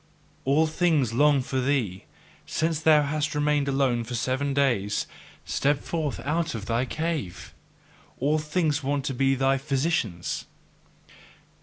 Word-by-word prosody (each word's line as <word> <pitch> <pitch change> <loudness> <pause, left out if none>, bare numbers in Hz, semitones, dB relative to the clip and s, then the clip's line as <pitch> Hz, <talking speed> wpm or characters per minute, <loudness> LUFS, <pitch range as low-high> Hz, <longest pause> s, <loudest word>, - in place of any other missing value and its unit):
All 145 +4 +4
things 155 -7 +1
long 145 +1 +4
for 130 0 -2
thee, 125 -9 -1 0.4
since 160 -1 0
thou 155 -2 +5
hast 150 +1 -1
remained 150 -1 +1
alone 135 -3 +1
for 120 +2 -5
seven 130 +4 -1
days 120 -8 +1 0.4
step 145 +1 +1
forth 155 -1 -3
out 160 +1 -1
of 105 -2 -5
thy 115 +3 0
cave! 155 - -4 0.7
All 150 +4 +2
things 155 -1 0
want 140 0 -1
to 135 - -1
be 135 +1 +2
thy 135 +1 +2
physicians! 135 - -1
140 Hz, 135 wpm, -26 LUFS, 130-150 Hz, 0.7 s, thou